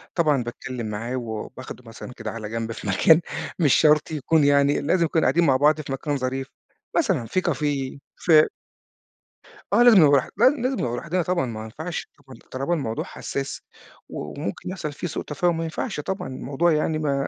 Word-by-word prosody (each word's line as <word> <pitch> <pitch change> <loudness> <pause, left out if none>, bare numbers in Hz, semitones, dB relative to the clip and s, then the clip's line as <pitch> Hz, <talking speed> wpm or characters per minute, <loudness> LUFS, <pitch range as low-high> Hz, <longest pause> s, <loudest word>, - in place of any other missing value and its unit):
طبعًا 150 -7 +2
باتكلم 120 -1 -6
معاه 115 +4 -4
وباخده 125 +2 -6
مثلًا 115 +2 -9
كده 110 -3 -6
على 110 -2 -6
جنب 115 0 -3
في 110 - -7
مكان 160 - +5 0.4
مش 145 -6 +4
شرط 150 0 +4
يكون 155 +1 +2
يعني 140 0 +3
لازم 170 +4 +2
يكون 160 0 +1
قاعدين 170 0 +3
مع 135 - +4
بعض 150 +2 +3
في 140 - -8
مكان 140 +2 -2
ظريف، 130 +1 -3 0.5
مثلًا 190 - +1
في 155 +12 0
كافيه 145 -5 -1 0.2
في 155 -3 +5 1.3
آه 240 - +6
لازم 240 -4 +8
نبقى 145 - +6
بر 140 -3 +3
لا 245 +3 +7
لازم 255 +2 0
نبقى 120 -1 -1
لوحدنا 175 +6 -1
طبعًا 175 -4 0
ما 110 -2 -6
ينفعش 160 +10 -6
ط 135 -4 -16
طالما 135 +7 -1
الموضوع 115 -9 -2
حساس 140 0 -5 0.5
وممكن 100 - -5
يحصل 180 -5 -4
فيه 175 - -5
سوء - - -4
تفاهم 165 +3 0
ما 165 - -2
ينفعش 160 -2 -4
طبعًا 190 +7 -4
الموضوع 140 +6 0
يعني 155 0 +1
ما 140 -2 0
145 Hz, 180 wpm, -24 LUFS, 125-165 Hz, 1.3 s, لازم